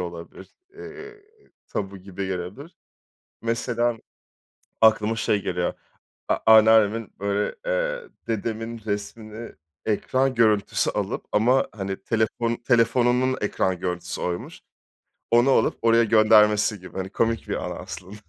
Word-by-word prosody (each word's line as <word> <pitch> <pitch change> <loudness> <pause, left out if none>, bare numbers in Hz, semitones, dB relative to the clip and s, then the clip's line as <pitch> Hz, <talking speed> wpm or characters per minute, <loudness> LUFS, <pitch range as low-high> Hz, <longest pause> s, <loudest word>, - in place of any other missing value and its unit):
olabilir, 85 +1 -8 0.3
eee, 420 0 -11 0.5
tabu 100 -1 -4
gibi 95 +1 -6
gelebilir. 95 - -6 0.7
Mesela 115 0 -1 0.8
aklıma 110 0 +4
şey 105 -3 0
geliyor, 90 -1 -2 0.5
a - - +2
anneannemin 110 0 +5
böyle, 100 +1 -1
eee, - - -1 0.2
dedemin 115 +1 -3
resmini 110 +2 -5 0.3
ekran 130 +5 0
görüntüsü 110 -3 +2
alıp - - -3
ama, 120 +5 +3
hani, 95 -2 -5
telefon 115 +1 0
telefonunun 120 +2 +2
ekran 95 -3 -1
görüntüsü 90 -1 -4
oymuş, 90 -1 -4 0.7
onu 120 +3 +5
alıp - - +2
oraya 115 0 +4
göndermesi 105 -2 +4
gibi. 90 -1 -12
Hani, 95 0 -4
komik 115 +1 -1
bir - - -1
anı - - -4
aslında. 95 +3 -9
110 Hz, 115 wpm, -24 LUFS, 100-120 Hz, 0.8 s, anneannemin